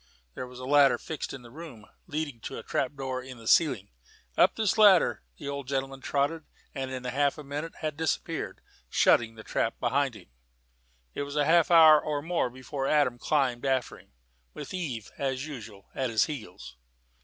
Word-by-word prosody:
There 125 Hz, -, -6 dB
was 125 Hz, 0 st, -12 dB
a 130 Hz, -, -7 dB
ladder 140 Hz, -1 st, +5 dB
fixed 160 Hz, -, -5 dB
in 135 Hz, -2 st, -8 dB
the 120 Hz, -, -13 dB
room, 140 Hz, -8 st, -10 dB, 0.2 s
leading 150 Hz, -6 st, -4 dB
to -, -, -7 dB
a -, -, -7 dB
trap 135 Hz, +1 st, -2 dB
door 130 Hz, -2 st, -3 dB
in 130 Hz, -1 st, -10 dB
the 115 Hz, -1 st, -11 dB
ceiling. 130 Hz, -, +3 dB, 0.4 s
Up -, -, +4 dB
this 215 Hz, -4 st, +1 dB
ladder 205 Hz, -5 st, +5 dB, 0.2 s
the 145 Hz, -, -8 dB
old 140 Hz, -2 st, -4 dB
gentleman 135 Hz, 0 st, -3 dB
trotted, 145 Hz, +4 st, -1 dB, 0.3 s
and 135 Hz, -1 st, -4 dB
in 130 Hz, -1 st, -5 dB
half 140 Hz, +4 st, 0 dB
a 150 Hz, -, -8 dB
minute 145 Hz, +4 st, -5 dB
had 155 Hz, -2 st, -3 dB
disappeared, 160 Hz, -1 st, -2 dB, 0.3 s
shutting 115 Hz, -1 st, +3 dB
the 110 Hz, -, -11 dB
trap -, -, -1 dB
behind -, -, +1 dB
him. -, -, -15 dB, 0.8 s
It -, -, -4 dB
was 140 Hz, 0 st, -5 dB
half 160 Hz, +4 st, +4 dB
an 175 Hz, -, +5 dB
hour 155 Hz, -2 st, +8 dB
or 145 Hz, -1 st, -2 dB
more 165 Hz, -5 st, 0 dB
before 130 Hz, +2 st, -5 dB
Adam 140 Hz, -5 st, +2 dB
climbed 130 Hz, -5 st, 0 dB
after 130 Hz, -2 st, -1 dB
him, -, -, -22 dB, 0.4 s
with -, -, -7 dB
Eve, 135 Hz, -, -4 dB
as 135 Hz, 0 st, -2 dB
usual, 110 Hz, -9 st, -10 dB
at 130 Hz, -2 st, -1 dB
his 110 Hz, -1 st, +3 dB
heels. 110 Hz, -, -8 dB
140 Hz, 190 wpm, -28 LUFS, 125-150 Hz, 0.8 s, hour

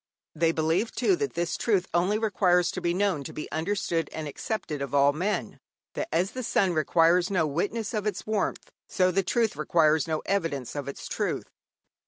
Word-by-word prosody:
They 165 Hz, +1 st, +2 dB
believe, 165 Hz, +7 st, 0 dB
too, 360 Hz, +9 st, +2 dB
that 425 Hz, +2 st, -3 dB
this 170 Hz, 0 st, -1 dB
truth 200 Hz, -6 st, +1 dB
only 180 Hz, +5 st, +2 dB
requires 180 Hz, -5 st, +2 dB
to -, -, -5 dB
be 170 Hz, -, +1 dB
known 185 Hz, -5 st, 0 dB
to -, -, -7 dB
be 150 Hz, -, -6 dB
understood 165 Hz, -1 st, -1 dB
and 155 Hz, -1 st, -5 dB
accepted 150 Hz, -1 st, -4 dB
of 140 Hz, +1 st, -3 dB
all 140 Hz, 0 st, +5 dB
men; 190 Hz, +7 st, -2 dB, 0.3 s
that 320 Hz, -, -3 dB
as 185 Hz, +3 st, +1 dB
the 255 Hz, -, -5 dB
sun 195 Hz, -5 st, +1 dB
requires 165 Hz, +3 st, +3 dB
no 185 Hz, -5 st, +2 dB
witness 205 Hz, -, -2 dB
of 215 Hz, -1 st, -1 dB
its 200 Hz, -3 st, -3 dB
warmth, 215 Hz, -2 st, -2 dB, 0.2 s
so 185 Hz, -1 st, +2 dB
the 195 Hz, +2 st, +2 dB
truth 225 Hz, +2 st, 0 dB
requires 155 Hz, 0 st, +2 dB
no 155 Hz, -1 st, -2 dB
evidence 165 Hz, -11 st, -2 dB
of 145 Hz, -2 st, -4 dB
its 140 Hz, -, -6 dB
truth. -, -, -3 dB
175 Hz, 190 wpm, -27 LUFS, 155-205 Hz, 0.3 s, all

